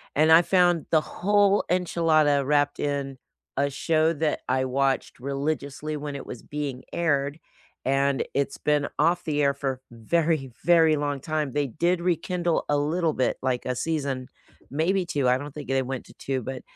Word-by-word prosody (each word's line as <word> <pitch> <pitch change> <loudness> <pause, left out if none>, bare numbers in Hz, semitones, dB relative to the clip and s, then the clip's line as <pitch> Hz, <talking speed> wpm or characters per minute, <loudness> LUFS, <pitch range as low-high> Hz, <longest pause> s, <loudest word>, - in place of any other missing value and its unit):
And 155 +2 +4
I 160 +2 +9
found 175 -3 +3
the 160 - +5
whole 205 +4 +2
enchilada 155 -5 +2
wrapped 145 0 +1
in 140 -2 -2 0.4
a 140 +1 +2
show 160 +3 +1
that 155 -1 -1
I 130 0 +1
watched 135 -1 -1
religiously 140 +2 -3
when 145 -1 -5
it 140 - -7
was 120 - -8
being 140 -3 -5
aired, 145 -3 0 0.5
and 135 0 +2
it's 140 0 -1
been 150 -1 +1
off 170 +3 +2
the 150 -2 0
air 140 0 +3
for 140 -1 -2
a 130 - -13 0.2
very, 155 +3 0
very 165 -2 +5
long 145 -1 -2
time. 155 -1 -2
They 145 -1 0
did 170 +8 0
rekindle 175 -1 0
a 145 - +3
little 160 +3 +1
bit, 130 - 0
like 130 -2 -1
a 125 - -1
season, 140 -3 -2 0.4
maybe 175 +6 +1
2. 145 -6 0
I 125 - +4
don't 145 +1 -8
think 150 -1 -8
they 135 0 +2
went 130 0 -5
to - - -16
2, 135 -1 -3
but, 130 +2 -5
145 Hz, 180 wpm, -25 LUFS, 135-165 Hz, 0.5 s, I